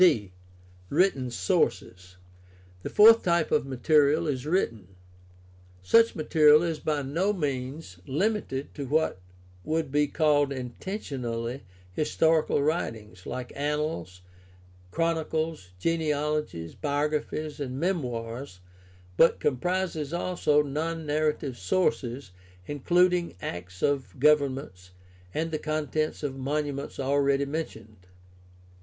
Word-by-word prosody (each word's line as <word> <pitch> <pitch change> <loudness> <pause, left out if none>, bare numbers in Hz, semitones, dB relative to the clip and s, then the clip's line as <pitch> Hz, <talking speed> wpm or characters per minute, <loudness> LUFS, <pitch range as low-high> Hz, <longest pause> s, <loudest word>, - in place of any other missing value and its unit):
d) 105 - -3 0.6
Written 145 -6 +2
sources. 90 -3 -1 0.3
— 90 0 -26
The - - -5
fourth 225 +2 +7
type 170 -2 +1
of - - +2
material 145 +4 +3
is 140 -2 -2
written. 115 - -1 0.9
Such 230 - +4
material 155 0 +5
is 165 -3 -2
by 150 -2 -1
no 170 +10 0
means 135 - -4
limited 160 -3 -1
to 140 -3 -5
what 150 -9 0 0.4
would 160 -2 -1
be 145 +1 +2
called 145 -2 +2
intentionally 125 - -4 0.3
historical 155 - +2
writings, 110 - -3
like 125 -1 -5
annals, 150 - -2 0.7
chronicles, 160 - -1
genealogies, 150 - -1
biographies, 150 +1 -2
and 130 -2 -4
memoirs, 125 - -3 0.6
but 165 - +5
com 140 -4 +1
prises 175 -2 -2
also 170 -4 +1
non 160 +3 -3
narrative 150 -3 -1
sources, 120 - -1 0.3
including 175 - +2
acts 90 +1 -7
of 135 -8 -1
govern 145 -1 +4
ments, 90 -9 -10 0.4
and 160 - -2
the 155 - -2
contents 155 0 -2
of 140 -2 -2
"monuments" 140 +1 -3
already 140 +1 +2
mentioned. 110 - -6
145 Hz, 110 wpm, -27 LUFS, 125-160 Hz, 0.9 s, fourth